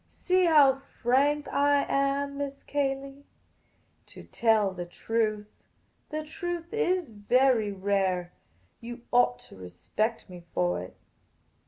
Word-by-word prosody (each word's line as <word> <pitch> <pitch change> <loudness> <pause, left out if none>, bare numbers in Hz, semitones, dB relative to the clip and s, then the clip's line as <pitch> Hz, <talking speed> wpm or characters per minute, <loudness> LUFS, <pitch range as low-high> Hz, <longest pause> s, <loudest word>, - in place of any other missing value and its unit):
See 365 0 +1
how 290 -5 +6
frank 275 +3 0
I 285 0 +3
am, 280 0 0
Miss 280 -1 -5
Cayley. 275 0 -3 0.9
I - - -8
tell 220 -4 +2
the 175 -1 -6
truth. 215 +2 -2 0.6
The 310 0 -3
truth 345 +2 -5
is 370 - 0
very 225 +1 +2
rare. 190 -2 -1 0.5
You 240 +1 -8
ought 240 - +4
to - - -15
respect 95 - -3
me 180 -2 -11
for 175 0 +1
it." - - -11
260 Hz, 120 wpm, -28 LUFS, 205-285 Hz, 0.9 s, how